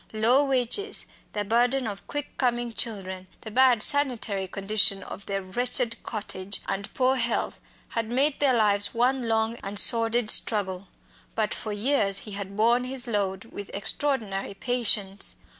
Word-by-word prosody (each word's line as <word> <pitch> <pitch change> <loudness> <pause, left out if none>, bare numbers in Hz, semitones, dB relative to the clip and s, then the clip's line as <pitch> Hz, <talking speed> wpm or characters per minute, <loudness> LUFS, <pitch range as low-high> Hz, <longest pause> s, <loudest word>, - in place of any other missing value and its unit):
Low 240 +6 +4
wages, 270 - 0 0.3
the 205 - -1
burden 245 +5 +2
of 205 -3 -6
quick 290 -1 -4
coming 240 -2 0
children, 190 -5 -4
the 220 - -8
bad 250 -2 +4
sanitary 240 -9 +1
conditions 195 0 +2
of 200 - -9
their 195 -1 -2
wretched 240 +4 -1
cottage, 200 -3 -5
and 195 +1 -3
poor 260 0 +2
health, 235 -1 -2 0.3
had 230 -1 -3
made 275 +4 +1
their 275 -3 +4
lives 205 -1 +2
one 250 +1 +1
long 225 +1 0
and 200 -1 -7
sordid 230 +1 +4
struggle. 195 -3 +1 0.5
But 215 -1 0
for 215 - -5
years 205 -2 +1
he 210 - -8
had 200 0 -7
borne 235 +3 +3
his 260 -1 -2
load 200 -3 -1
with 205 -3 -9
extraordinary 205 -3 -2
patience. 205 -4 +1
225 Hz, 150 wpm, -26 LUFS, 200-245 Hz, 0.5 s, Low